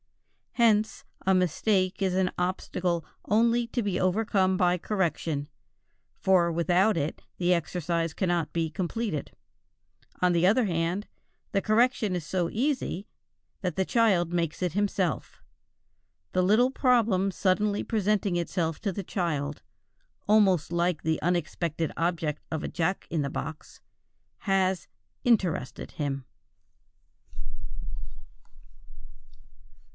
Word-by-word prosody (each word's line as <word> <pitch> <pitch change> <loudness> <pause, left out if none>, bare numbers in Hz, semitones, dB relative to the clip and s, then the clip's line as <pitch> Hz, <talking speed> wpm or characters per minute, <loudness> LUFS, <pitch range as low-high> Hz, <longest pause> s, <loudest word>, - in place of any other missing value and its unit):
Hence 220 -3 +2 0.2
a 190 - +4
mistake 185 +2 +1
is 190 -2 +1
an 185 -1 +2
obstacle 180 -1 -1 0.2
only 230 +3 +3
to 240 +1 -1
be 195 -3 -1
overcome 190 0 +2
by 180 -1 +3
correction, 165 -6 -1 0.7
for 180 -3 +3
without 175 +5 +2
it 150 +1 -2 0.2
the 180 0 +3
exercise 170 -1 -1
cannot 175 -4 0
be 165 -1 -1
completed. 185 0 -3 0.9
On 180 -1 +4
the 170 +1 +3
other 220 +5 +4
hand, 175 +2 -1 0.4
the 195 - +1
correction 215 -2 +2
is 170 -4 -3
so 175 0 -1
easy 245 - -1 0.5
that 180 -5 -2
the 190 - +1
child 190 -8 +2
makes 170 -2 -1
it 180 -3 0
himself. 200 -3 -1 0.9
The 185 - +3
little 225 +7 +4
problem 230 -8 +3
suddenly 200 +2 +1
presenting 210 -3 +1
itself 170 -2 -1
to 200 - -1
the 195 +2 -4
child, 150 -6 -2 0.7
almost 195 -7 +4
like 170 -2 0
the 160 0 0
unexpected 170 -1 -1
object 165 -3 -1
of 160 -1 -2
a - - -2
jack 180 +2 -1
in 160 - +1
the 140 - -1
box, 155 +3 -7 0.6
has 190 -2 +1 0.4
"interested" 190 - +1
him. 140 -3 -3
180 Hz, 115 wpm, -28 LUFS, 170-205 Hz, 0.9 s, a